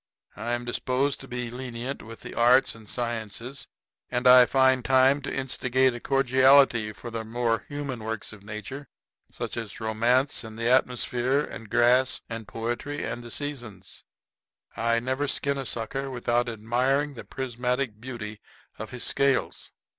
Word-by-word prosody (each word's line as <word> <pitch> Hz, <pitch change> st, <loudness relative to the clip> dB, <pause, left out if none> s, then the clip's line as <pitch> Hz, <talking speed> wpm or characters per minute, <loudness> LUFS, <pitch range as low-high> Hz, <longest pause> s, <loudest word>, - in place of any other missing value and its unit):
I 120 Hz, -, -3 dB
am 120 Hz, 0 st, -2 dB
disposed 130 Hz, +3 st, 0 dB
to -, -, -9 dB
be 125 Hz, -1 st, -4 dB
lenient 125 Hz, +1 st, -5 dB
with 115 Hz, +1 st, -11 dB
the -, -, -8 dB
arts 125 Hz, +3 st, +4 dB
and 110 Hz, -2 st, -13 dB
sciences; 120 Hz, +2 st, -4 dB, 0.4 s
and 125 Hz, 0 st, -2 dB
I 125 Hz, -1 st, +9 dB
find 130 Hz, -1 st, +3 dB
time 135 Hz, +2 st, +4 dB
to 140 Hz, -, -4 dB
instigate 130 Hz, -1 st, +1 dB
a 120 Hz, -, -6 dB
cordiality 130 Hz, -3 st, +4 dB
for 115 Hz, +3 st, -9 dB
the 115 Hz, -1 st, -3 dB
more 115 Hz, 0 st, -1 dB
human 140 Hz, -5 st, -4 dB
works 110 Hz, -1 st, -4 dB
of 105 Hz, -, -13 dB
nature, 110 Hz, +7 st, -7 dB, 0.4 s
such -, -, -4 dB
as 115 Hz, -3 st, -5 dB
romance 120 Hz, +5 st, +1 dB
and 110 Hz, -1 st, -9 dB
the 115 Hz, 0 st, -1 dB
atmosphere 125 Hz, +1 st, +2 dB
and 115 Hz, -6 st, -9 dB
grass 120 Hz, +2 st, +4 dB
and 115 Hz, -2 st, -5 dB
poetry 120 Hz, +6 st, -4 dB
and 120 Hz, -, -4 dB
the 120 Hz, -, -9 dB
Seasons. 120 Hz, -9 st, -6 dB, 0.7 s
I 115 Hz, 0 st, +1 dB
never 130 Hz, +4 st, -1 dB
skin 140 Hz, 0 st, 0 dB
a 135 Hz, -, -4 dB
sucker 135 Hz, +4 st, -3 dB
without 120 Hz, -1 st, 0 dB
admiring 125 Hz, +6 st, 0 dB
the 120 Hz, -, -8 dB
prismatic 125 Hz, -3 st, -2 dB
beauty 110 Hz, -4 st, -6 dB, 0.4 s
of 110 Hz, 0 st, -6 dB
his 125 Hz, +1 st, -5 dB
scales. 140 Hz, -1 st, 0 dB
125 Hz, 155 wpm, -26 LUFS, 115-130 Hz, 0.7 s, I